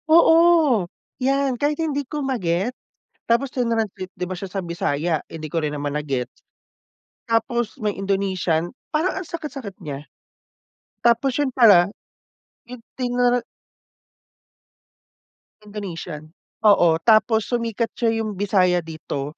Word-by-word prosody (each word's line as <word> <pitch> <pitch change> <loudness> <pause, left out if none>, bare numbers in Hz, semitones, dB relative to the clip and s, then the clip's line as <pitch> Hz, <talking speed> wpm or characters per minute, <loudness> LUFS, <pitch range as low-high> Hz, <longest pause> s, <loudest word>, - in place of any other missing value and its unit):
Oo, 325 - +5 0.3
'yan 270 -1 +1
kahit 295 +1 +1
hindi 300 -3 -1
ko 295 -1 -4
ma-get 195 -3 -1 0.5
tapos 235 +4 +2
trinanslate 225 -6 -2
'di 180 - -4
ba 185 - -4
siya 190 +1 -7
sa 195 - -2
Bisaya, 170 -2 -1
eh, - - -15
hindi 155 - -5
ko 165 +2 -2
rin 150 -1 -1
naman 145 -1 -3
na-gets. 135 -4 -3 0.9
Tapos 230 +1 0
may 210 -3 -1
Indonesian, 190 -4 -1 0.2
parang 320 +4 0
ang 375 -3 -5
sakit-sakit 285 - -7
niya. 145 -5 -6 1.0
Tapos 240 +3 +3
'yun 285 0 0
pala 205 -8 +6 0.8
'yung 250 0 -8 0.2
trinan 245 -1 +1 2.2
Indonesian, 175 -6 -7 0.3
oo 200 -5 +6 0.2
tapos 220 -1 +4
sumikat 230 -1 -1
siya 230 -2 +1
'yung 215 -1 -3
Bisaya 185 -3 +2
dito 155 -2 -6
215 Hz, 120 wpm, -22 LUFS, 175-250 Hz, 2.2 s, pala